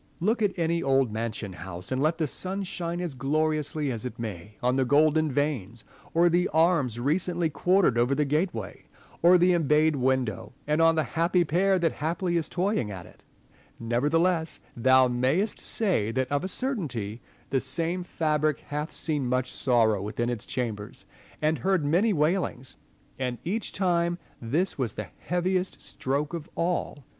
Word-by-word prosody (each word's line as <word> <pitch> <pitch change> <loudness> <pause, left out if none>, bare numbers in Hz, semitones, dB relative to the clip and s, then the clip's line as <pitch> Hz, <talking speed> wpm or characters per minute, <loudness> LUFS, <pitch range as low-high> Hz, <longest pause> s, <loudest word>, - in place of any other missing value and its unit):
Look 220 +7 +1
at 205 -2 +1
any 170 0 +1
old 135 -3 +2
mansion 110 -2 -4
house, 90 +2 -7
and 130 0 0
let 155 +3 +2
the 160 - 0
sun 190 +7 -3
shine 175 -2 -3
as 175 -4 -3
gloriously 150 +1 0
as 115 -3 -3
it 125 - -5
may 105 -2 -7
on 125 +1 +2
the 135 - +2
golden 155 +3 +3
vanes, 125 -6 -2 0.3
or 170 +1 +5
the 175 +1 +2
arms 160 -7 +2
recently 170 +4 0
quartered 175 -7 +3
over 125 +3 +2
the 150 +1 +1
gateway 150 - -2 0.4
or 175 +2 +7
the 180 +1 +4
embayed 155 -1 +3
window, 130 -5 -1
and 150 +2 +1
on 165 0 +5
the 155 - +2
happy 170 +3 +1
pair 190 +4 +2
that 170 -3 +1
haply 170 +3 -2
is 165 -2 0
toying 185 - 0
at 95 -4 -7
it: - - -19 0.5
nevertheless, 160 +8 +1 0.2
thou 130 +2 +5
mayest 130 - 0
say 175 - 0
that 130 +2 -1
of 145 +3 0
a - - -1
certainty 145 - -3 0.3
the 135 - +3
same 165 +7 -2
fabric 155 -3 0
hath 150 +2 -4
seen 150 -5 -2
much 125 +1 0
sorrow 115 -6 +2
within 120 +4 -2
its 120 -3 -5
chambers, 110 -5 -4 0.4
and 155 +1 +2
heard 190 -5 +1
many 180 +10 +3
wailings; 150 -6 0 0.4
and 125 -2 -2
each 210 +6 -2
time 175 -2 +1 0.2
this 150 +10 -1
was 120 -6 0
the - - -6
heaviest 180 +1 -1
stroke 145 +4 -3
of 165 -2 -5
all. 165 -5 -2
150 Hz, 165 wpm, -27 LUFS, 125-175 Hz, 0.5 s, or